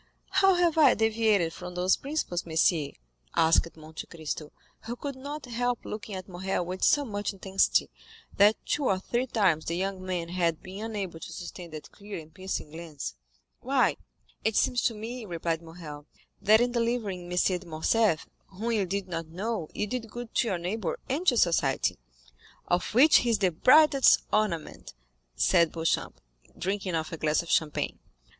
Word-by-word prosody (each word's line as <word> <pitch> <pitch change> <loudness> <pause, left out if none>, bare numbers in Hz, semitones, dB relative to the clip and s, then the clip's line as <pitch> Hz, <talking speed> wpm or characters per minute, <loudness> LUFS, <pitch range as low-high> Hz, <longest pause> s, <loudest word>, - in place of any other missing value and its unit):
"How 385 -1 +5
have 345 -2 +2
I 305 - +7
deviated 215 -6 +2
from 180 0 -8
those 180 +1 +3
principles, 275 - -3
monsieur?" 160 -2 +2 0.5
asked 165 0 +3
Monte 155 0 -9
Cristo, 155 -2 -6 0.3
who 235 +2 -4
could 280 +2 -5
not 285 +3 -7
help 245 0 -2
looking 210 -1 -6
at 185 0 -7
Morrel 185 -1 -2
with 185 +2 -5
so 290 -1 +4
much 205 -3 -3
intensity, 195 0 +2 0.5
that 205 +2 +6
two 290 - 0
or 195 - +2
three 240 +7 -2
times 190 -10 +2
the 170 - -2
young 190 0 -3
man 180 -2 -3
had 170 -3 0
been 190 +3 -7
unable 195 -7 -4
to - - -8
sustain 175 0 -8
that 155 -1 -9
clear 205 0 -8
and 160 0 -14
piercing 185 -4 -5
glance. 160 - -6 0.5
"Why, - - +2 0.5
it 220 -1 +1
seems 245 -1 +2
to 230 - +1
me," 230 +3 -6
replied 170 -3 -2
Morrel, 160 -3 -10 0.3
"that 220 +2 +5
in 245 0 +2
delivering 230 -7 -2
M. 180 - -2 0.2
de - - -14
Morcerf, 165 +3 +1 0.2
whom 215 +5 -4
you 205 -5 +1
did 195 +1 -2
not 165 -2 -4
know, 185 +1 -3
you 210 - -2
did 230 +1 -4
good 240 +1 -8
to - - +2
your 190 -5 0
neighbor 180 +2 -3
and 310 +8 -2
to 245 - +5
society." 170 -5 +2 0.7
"Of 180 +4 0
which 295 +6 +8
he 245 - +1
is 230 - +3
the 190 -3 +2
brightest 275 - +6
ornament," 195 - -1 0.4
said 170 - +3
Beauchamp, 165 0 -1 0.4
drinking 190 -1 -2
off 160 -1 -2
a 165 - -5
glass 155 +2 +1
of 170 - -6
champagne. 150 -2 0
190 Hz, 175 wpm, -28 LUFS, 170-230 Hz, 0.7 s, which